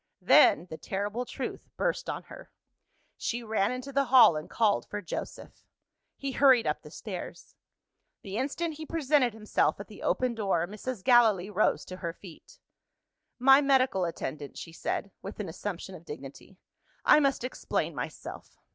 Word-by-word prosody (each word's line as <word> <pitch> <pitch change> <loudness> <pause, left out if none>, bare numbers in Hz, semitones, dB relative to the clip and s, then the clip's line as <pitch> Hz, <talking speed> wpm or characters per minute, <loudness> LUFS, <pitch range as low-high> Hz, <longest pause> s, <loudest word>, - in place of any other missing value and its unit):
Then, 170 - +6
the 160 - -7
terrible 205 +5 -3
truth - - -6
burst - - -1
on - - -4
her. - - -12 0.7
She 240 0 -3
ran 215 -2 0
into 255 +2 -6
the 275 +1 +2
hall, 250 -9 +7
and 155 - -5
called 215 -3 +1
for 210 - -4
Joseph. 185 - -7 0.5
He 275 -1 -4
hurried 260 -3 +5
up - - -1
the - - -12
stairs. - - -8 0.7
The 195 -1 -6
instant 295 +6 -2
he 315 - -7
presented 290 -6 +2
himself 215 -1 0
at - - -8
the - - -12
open 255 -1 0
door, 195 -7 0
Mrs. 210 +1 -6
Gallilee 220 -6 +4
rose 210 +2 +1
to 185 - -8
her 170 -2 -4
feet. 175 -3 -14 0.8
"My 270 +2 +7
medical 265 -8 +3
attendant," 150 -4 -5
she 165 - -8
said, 195 +3 -3
with 195 +3 -8
an 210 - -3
assumption 190 +2 -6
of 170 -3 -11
dignity; 150 +3 -10 0.5
"I - - +7
must 275 -4 +1
explain 255 - -2
myself." - - -7
220 Hz, 160 wpm, -29 LUFS, 190-260 Hz, 0.8 s, hall